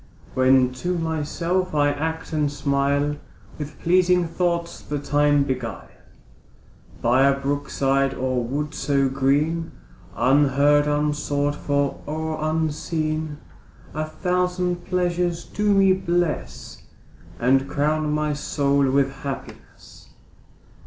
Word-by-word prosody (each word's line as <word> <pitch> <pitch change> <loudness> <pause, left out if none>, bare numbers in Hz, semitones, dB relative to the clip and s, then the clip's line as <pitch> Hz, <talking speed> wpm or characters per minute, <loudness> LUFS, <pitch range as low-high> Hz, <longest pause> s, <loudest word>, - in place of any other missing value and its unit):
When 130 -1 +4
to 180 0 -1
myself 165 +2 -1
I 145 -1 +3
act 160 +2 -4
and 150 -2 +1
smile, 140 +1 0 0.4
With 150 0 -7
pleasing 180 0 +3
thoughts 170 0 -2
the 145 - -4
time 145 0 +2
beguile, 130 -5 -4 1.1
By 130 +3 +4
a 140 0 +2
brook 140 +1 -2
side 135 0 +1
or 130 -1 -1
wood 145 +5 -3
so 140 -1 +1
green, 145 +5 0 0.4
Unheard, 145 +2 +3
unsought 145 -1 0
for, 145 -1 -1
or 155 +1 -3
unseen, 155 -1 -2 0.6
A 155 +1 -2
thousand 180 +1 -1
pleasures 175 -1 0
do 210 0 0
me 195 -1 +5
bless, 175 -4 -2 0.6
And 135 +3 +2
crown 150 +1 0
my 150 0 0
soul 140 -1 +1
with 135 0 +2
happiness. 135 0 -9
150 Hz, 110 wpm, -23 LUFS, 140-165 Hz, 1.1 s, me